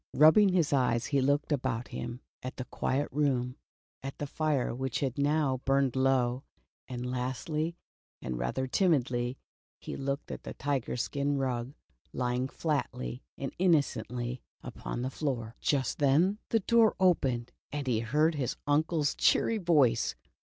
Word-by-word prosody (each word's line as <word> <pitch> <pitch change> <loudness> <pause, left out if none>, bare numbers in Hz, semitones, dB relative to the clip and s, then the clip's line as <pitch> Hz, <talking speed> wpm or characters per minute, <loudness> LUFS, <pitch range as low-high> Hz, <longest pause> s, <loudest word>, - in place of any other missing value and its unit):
Rub 155 +3 +8
bing 210 -2 +6
his 175 -6 +2
eyes 125 -3 +2
he 140 -2 +1
looked 145 +3 +1
about 130 -4 -1
him 120 +1 -5 0.2
at 130 - -6
the 125 - -4
quiet 135 +2 -1
room, 130 -3 0 0.5
at 135 +1 -6
the 145 - -3
fire 145 -3 0
which 130 0 -2
had 135 -1 -1
now 140 -3 +2
burned 135 -2 +2
low, 130 -1 +2 0.4
and 125 -1 -5
lastly, 130 +6 -2 0.4
and 60 -1 -4
rather 60 - -1
timidly, 130 -6 +1 0.4
he - - -7
looked 140 +1 -3
at - - -6
the - - -8
tiger 135 -4 -1
skin 140 +3 0
rug 130 -1 -2 0.4
lying 125 +1 0
flatly 135 - -2 0.2
and - - -4
innocently 125 -8 +1 0.2
upon 120 - -5
the 130 - -2
floor. 120 -7 -3
Just 135 -3 0
then 160 +9 +3
the 225 - +2
door 230 +1 +4
opened, 135 -10 +2 0.2
and 145 -1 -3
he 120 -4 +1
heard 150 +8 +2
his 140 -5 -2
uncle's 150 +1 +2
cheery 225 - +3
voice. 155 - +3
135 Hz, 150 wpm, -30 LUFS, 125-150 Hz, 0.5 s, Rub